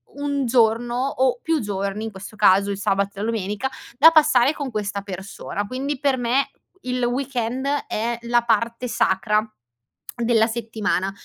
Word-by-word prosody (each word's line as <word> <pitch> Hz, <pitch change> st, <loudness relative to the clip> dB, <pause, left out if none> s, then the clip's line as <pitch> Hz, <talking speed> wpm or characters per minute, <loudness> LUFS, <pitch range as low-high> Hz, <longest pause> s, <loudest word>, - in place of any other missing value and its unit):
un 285 Hz, -1 st, -1 dB
giorno 235 Hz, 0 st, +2 dB
o 260 Hz, -2 st, +1 dB
più 325 Hz, -1 st, 0 dB
giorni, 200 Hz, +1 st, -3 dB
in 220 Hz, -, -5 dB
questo 195 Hz, +2 st, -10 dB
caso 200 Hz, 0 st, +4 dB
il 200 Hz, -, -4 dB
sabato 200 Hz, 0 st, 0 dB
e -, -, -8 dB
la -, -, -1 dB
domenica, 220 Hz, +2 st, -2 dB, 0.3 s
da 315 Hz, +4 st, +9 dB
passare 295 Hz, -4 st, +5 dB
con 285 Hz, -4 st, -5 dB
questa 205 Hz, -2 st, -3 dB
persona. 200 Hz, +1 st, -6 dB
Quindi, 265 Hz, +3 st, -3 dB
per 275 Hz, -2 st, +1 dB
me 250 Hz, +3 st, +1 dB, 0.3 s
il 250 Hz, 0 st, -2 dB
weekend 250 Hz, 0 st, -2 dB, 0.2 s
è 230 Hz, +2 st, -2 dB
la 240 Hz, 0 st, +2 dB
parte 230 Hz, +2 st, 0 dB
sacra 210 Hz, +2 st, +1 dB, 0.7 s
della 235 Hz, -2 st, +2 dB
settimana. 220 Hz, -4 st, -2 dB
230 Hz, 155 wpm, -22 LUFS, 205-255 Hz, 0.7 s, da